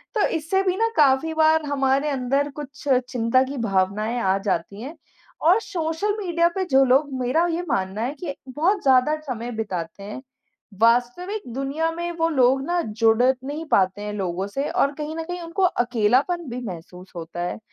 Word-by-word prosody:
तो 425 - +3
इससे 330 +4 0
भी 370 -1 +1
ना 455 +1 +2
काफ़ी 295 +2 +4
बार 315 -1 +3
हमारे 275 +1 +1
अंदर 275 +2 0
कुछ 285 0 -9 0.3
चिंता 245 +1 +2
की 275 +2 -6
भावनाएँ 200 +5 0
आ 190 -3 +2
जाती 200 +3 -2
हैं। 290 +7 -7 0.5
और 355 +7 +5
सोशल 370 +3 -2
मीडिया 340 -4 +2
पे 380 -1 0
जो 270 0 +6
लोग, 270 +2 +2
मेरा 315 +8 +2
ये 335 +2 -1
मानना 195 -2 -1
है 250 +5 -1
कि 295 -6 -5 0.2
बहुत 370 +6 +2
ज़्यादा 265 +3 +4
समय 240 -1 -4
बिताते 190 -3 -4
हैं, 210 +6 -7 0.6
वास्तविक 245 - +2
दुनिया 280 +5 -1
में 345 +1 -4
वो 330 - +3
लोग 265 -3 +3
ना, 350 0 0
जुड़ 225 0 +2
नहीं 265 +5 0
पाते 190 +1 +2
हैं 210 0 -4
लोगों 190 -1 -2
से 275 +8 -3
और 280 - +2
कहीं 305 +1 -5
न 325 - -3
कहीं 355 +2 -6
उनको 335 +3 -2
अकेलापन 250 - +2
भी 245 +1 -4
महसूस 180 0 -9
होता 170 +1 -6
है। 175 - -3
270 Hz, 180 wpm, -23 LUFS, 225-325 Hz, 0.6 s, जो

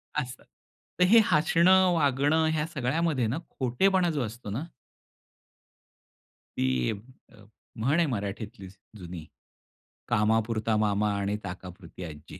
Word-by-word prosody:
असं. 125 -4 -4 0.6
तर - - +6
हे 230 +4 +7
हसणं, 180 +4 +4
वागणं 145 +1 +2
ह्या 155 -1 0
सगळ्यामध्ये 145 -2 0
ना 120 +7 -2
खोटेपणा 175 +9 +1
जो 150 -3 -2
असतो 110 0 -8
ना 115 +9 -3 2.0
ती 65 -1 +1 0.4
अ, 105 - -18 0.3
म्हण 130 +8 +1
आहे 170 - +4
मराठीतलीच 100 -2 -6 0.2
जुनी, 90 -3 -8 0.8
"कामापुरता 110 +1 +1
मामा 105 0 +1
आणि 100 +1 -1
ताकापुरती 90 -1 -9
आजी." 75 -3 -10
115 Hz, 110 wpm, -27 LUFS, 100-155 Hz, 2.0 s, हे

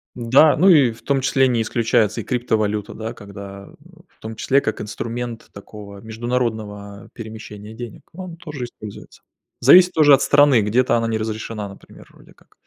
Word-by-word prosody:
Да, 130 +6 +4
ну 180 +5 +3
и, 145 -10 +5
в 110 - -15
том 140 -1 0
числе, 135 0 +2
не 120 -3 0
исключается 115 -1 0
и - - -4
криптовалюта, 110 -4 -2
да, 110 +1 -6
когда 100 -2 -11 0.4
В - - -35
том 110 0 -8
числе, 135 +5 +2
как 110 - -4
инструмент 115 +2 -6
такого 100 0 -12
международного 110 -3 -4
перемещения 110 -2 -10
денег. 115 -1 -9
Он 180 -1 -9
тоже 150 -7 -7
используется. 105 -3 -12 0.4
Зависит 180 +8 +7
тоже 150 -2 +5
от 135 - +5
страны, 145 -5 +4
где-то 120 +4 +1
она 115 0 -1
не 110 -1 -1
разрешена, 110 -1 -5
например, 100 - -16
вроде - - -20
как. - - -28
115 Hz, 165 wpm, -20 LUFS, 105-130 Hz, 0.4 s, Зависит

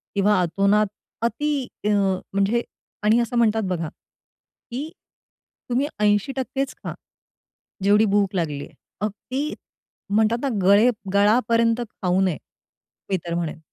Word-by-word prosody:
किंवा 200 0 +3
अतोनात 200 +4 +2 0.3
अति 270 +3 0 0.2
अ, - - +3
म्हणजे 200 +2 +1 0.4
आणि 220 +3 +4
असं 240 +1 -2
म्हणतात 225 -1 +3
बघा, 165 -3 -1 0.8
की 280 +6 -4 0.8
तुम्ही 260 +4 +1
80% 260 +6 0
खा, - - -4 0.9
जेवढी 210 +2 +5
भूक 200 -1 +1
लागली 150 -5 -1
आहे. - - -19 0.3
अगदी 255 +8 -3 0.6
म्हणतात 220 +2 +3
ना, 275 - 0
गळे 200 +6 +6 0.2
गळापर्यंत 230 +3 +3
खाऊ 185 -2 0
नये, 185 -5 +1 0.7
मी 190 - +2
तर 170 - -3
म्हणेन. 165 -2 -3
210 Hz, 120 wpm, -23 LUFS, 195-235 Hz, 0.9 s, गळे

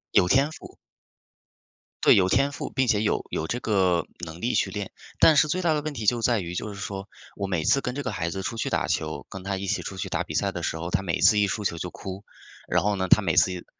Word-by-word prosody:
有 90 - +5
天 135 +5 +4
赋。 - - -12 1.3
对， - - +7
有 95 -2 +3
天 140 +5 +2
赋， - - -5
并 130 -1 0
且 105 -2 +2
有 105 - 0
有 80 - -2
这 120 - -2
个 95 -6 +1 0.2
能 80 +1 -9
力 120 - -1
去 95 - +1
练， 100 0 -5 0.3
但 160 - +7
是 155 - +5
最 185 +5 -1
大 165 -3 +2
的 150 - 0
问 155 0 -4
题 110 -5 -5
就 120 +1 +2
在 115 -2 +2
于 85 -1 -5
就 105 +4 -3
是 100 - -9
说， 100 0 -6 0.3
我 100 -1 -3
每 90 -5 -1
次 135 - +3
跟 125 +1 -4
这 145 - -3
个 125 - -2
孩 85 0 -2
子 95 +2 -4
出 115 - -4
去 - - -1
打 - - 0
球， - - -2
跟 95 -1 -8
他 100 0 -2
一 100 - -4
起 - - -1
出 95 - -7
去 - - -3
打 - - -1
比 - - -7
赛 - - +1
的 - - -5
时 80 - -2
候， 85 +2 -4
他 95 - +1
每 85 -4 -2
次 105 -3 +5
一 100 - +3
输 105 +2 -3
球 85 - -1
就 90 - -4
哭， 95 +3 -8 0.4
然 - - +1
后 105 0 +1
呢， 95 -1 -1
他 110 - +6
每 85 -3 0
次， 90 -1 +2
100 Hz, 295 characters per minute, -25 LUFS, 90-120 Hz, 1.3 s, 对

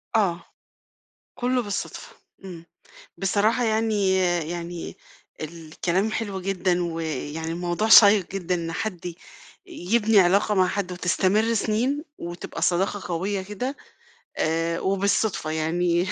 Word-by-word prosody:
آه. 175 -5 +1 0.9
كُلّه 250 +1 0
بالصدفة، 205 -3 -5 0.3
إمم. 170 -3 -9 0.5
بصراحة 210 +5 +1
يعني 215 -4 +1 0.3
يعني 175 0 -6 0.4
الكلام 170 +5 -2
حلو 205 -4 -3
جدًا 180 -2 0
ويعني 160 -1 -4
الموضوع 175 +5 -1
شيّق 205 -4 +8
جدًا 180 -2 -1
إن 165 -1 -4
حد 180 0 -4
ي 175 -2 -5 0.5
يبني 220 - +2
علاقة 200 +3 +3
مع 185 -1 +4
حد 195 -1 -2
وتستمر 190 +5 +1
سِنين 240 +7 0
وتبقى 175 +1 -7
صداقة 190 +3 +1
قوية 195 +4 -1
كده، 230 +9 -5 0.6
آآ 165 +1 0
وبالصُدفة، 195 -3 0
يعني 170 +3 0
185 Hz, 110 wpm, -24 LUFS, 170-210 Hz, 0.9 s, شيّق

